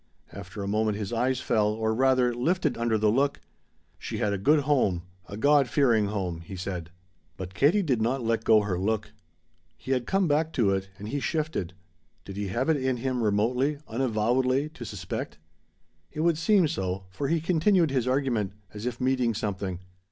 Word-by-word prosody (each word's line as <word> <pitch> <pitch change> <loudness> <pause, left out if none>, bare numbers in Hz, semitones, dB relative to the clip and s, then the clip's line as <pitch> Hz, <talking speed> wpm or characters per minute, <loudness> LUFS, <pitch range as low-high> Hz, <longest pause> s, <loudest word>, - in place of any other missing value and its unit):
After 95 +3 -7
a - - -4
moment 105 0 0
his 105 +2 -4
eyes 130 +2 0
fell, 105 -2 +2
or 110 +1 0
rather, 130 0 +3
lifted 165 +10 0
under 115 -1 +1
the 105 0 +3
look. 140 +4 +1 0.6
"She - - -5
had 105 - 0
a 100 - -2
good 150 +9 +4
home 125 -12 +1 0.3
a 100 - -6
God 140 +1 +4
fearing 120 -6 +3
home," 95 -5 -3
he 85 +4 -9
said. 90 -3 -5 0.5
But 95 0 -7
Katie 160 - +3
did 130 -9 0
not 125 +3 0
let 115 0 0
go 110 -2 +5
her 95 -4 -2
look. 105 +2 -1 0.7
He 130 - -6
had 125 -2 0
to - - -7
come 195 -1 +3
back 155 +2 +1
to 105 -6 +2
it, 95 0 -2
and 105 +1 -7
he 145 - -2
shifted. 150 - -2 0.5
Did 95 - -8
he 100 0 -3
have 120 +8 -1
it 160 -2 +3
in 130 -2 0
him 125 0 -2
remotely, 120 +7 +1
unavowedly, 125 +4 +1
to - - -9
suspect? - - -5 0.7
It 155 - -4
would 165 -1 +2
seem 190 0 +4
so, 95 -6 -3
for 135 +9 -3
he 165 +2 +1
continued 170 0 +2
his 130 -3 0
argument, 125 -7 0 0.2
as 105 +3 -5
if 120 -1 -4
meeting 125 -3 +1
something. 95 -4 -3
120 Hz, 190 wpm, -27 LUFS, 105-140 Hz, 0.7 s, go